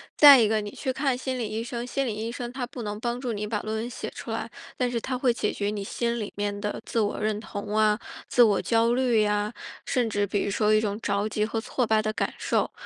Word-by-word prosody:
再 285 -3 +10
一 220 - +4
个 215 0 +1
你 205 -1 -6
去 260 -3 -3
看 270 -2 0
心 260 0 -3
理 235 -3 -2
医 220 +1 -3
生， 240 0 -4
心 275 +2 -1
理 220 - -1
医 225 +2 -3
生 240 0 -5
他 255 -1 -3
不 245 0 -8
能 205 -1 -4
帮 240 +1 -2
助 250 -3 -3
你 210 0 -3
把 210 -1 -1
论 215 0 -3
文 230 +2 -3
写 - - -5
出 - - -7
来， - - -3 0.3
但 250 -1 +1
是 235 -1 -2
他 255 +1 -2
会 250 -2 +2
解 210 -3 -1
决 200 0 -2
你 205 -1 -3
心 235 +3 -1
里 210 - -4
面 205 0 -2
的 210 0 -3
自 230 - -1
我 205 -1 0
认 215 0 0
同 210 -1 -5
啊， 215 0 +3 0.3
自 245 - +6
我 210 -4 +3
焦 230 0 +2
虑 245 -4 +3
呀， 210 +1 0 0.3
甚 245 -3 +1
至 205 -1 +1
比 205 0 -1
如 200 - -1
说 215 +1 +2
一 215 - +5
种 210 -1 -1
着 200 0 0
急 215 0 0
和 225 +1 -2
挫 250 +1 -1
败 220 0 +3
的 215 0 -2
感 - - -1
受。 - - 0
220 Hz, 290 characters per minute, -26 LUFS, 210-245 Hz, 0.3 s, 再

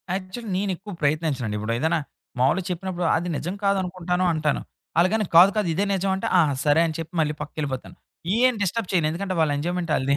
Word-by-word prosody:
Actually 195 +4 -6
నేనెక్కువ 195 +1 -3
ప్రయత్నించనండి. 145 -7 0
ఇప్పుడు 110 +2 -2
ఏదైనా 160 +3 +1 0.4
మామూలు 135 +9 +3
చెప్పినప్పుడు 180 0 -3
అది 170 +2 -1
నిజం 175 +3 -4
కాదు 200 0 +3
అనుకుంటాను 180 0 -1
అంటాను. 155 -2 0 0.8
కాదు 185 +3 +9
కాదు. 210 -4 +1
ఇదే 200 +4 +1
నిజం 195 0 0
అంటే. 190 - -3
ఆ! - - +7 0.2
సరే 150 +2 +4
అని 160 - -4
చెప్పి 165 +3 -6
మళ్ళీ 150 -1 0
పక్కకెళ్ళిపోతాను. 145 -3 -5 0.4
ఏం 255 +1 +4
డిస్టర్బ్ 200 +1 -1
చేయను. 170 -4 +3
ఎందుకంటే 185 +2 -3
వాళ్ళ 155 -2 +2
ఎంజాయ్మెంటాళ్ళది 155 -4 0
175 Hz, 170 wpm, -24 LUFS, 155-190 Hz, 0.8 s, కాదు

